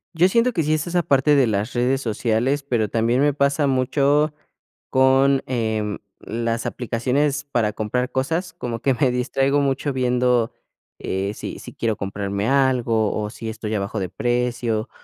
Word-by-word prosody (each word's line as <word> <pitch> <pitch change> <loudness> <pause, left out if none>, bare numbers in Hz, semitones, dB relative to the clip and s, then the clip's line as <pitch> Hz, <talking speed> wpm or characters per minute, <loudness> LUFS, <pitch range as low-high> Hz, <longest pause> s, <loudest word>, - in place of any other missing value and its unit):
Yo 175 +3 +4
siento 235 +4 +2
que 165 - 0
sí 155 +1 +1
es 155 +2 -1
esa 175 0 +1
parte 140 +1 +3
de 135 -3 +4
las 105 +1 -1
redes 125 +2 +1
sociales, 120 +4 0
pero 120 -6 0
también 120 +3 +1
me 145 0 +3
pasa 140 +1 +1
mucho 140 +3 +2 0.6
con, 135 +1 +4
em, 110 -4 -2 0.2
las 115 0 -3
aplicaciones 135 +5 -1
para 110 -5 +1
comprar 125 +4 -2
cosas, 160 +6 -1
como 120 -8 -5
que 135 - +2
me 130 -1 +2
distraigo 135 +3 +1
mucho 140 0 -1
viendo 125 -2 +1 0.5
eh, 95 +2 -2
si - - -7
si - - -10
quiero 115 -2 -1
comprarme 100 +2 -3
algo, 125 -6 +2
o 105 -1 -2
si 115 0 -8
esto 110 -1 -6
ya 110 -1 0
bajó 100 +2 -3
de 95 - -3
precio, 120 +1 -1
125 Hz, 170 wpm, -22 LUFS, 110-140 Hz, 0.6 s, Yo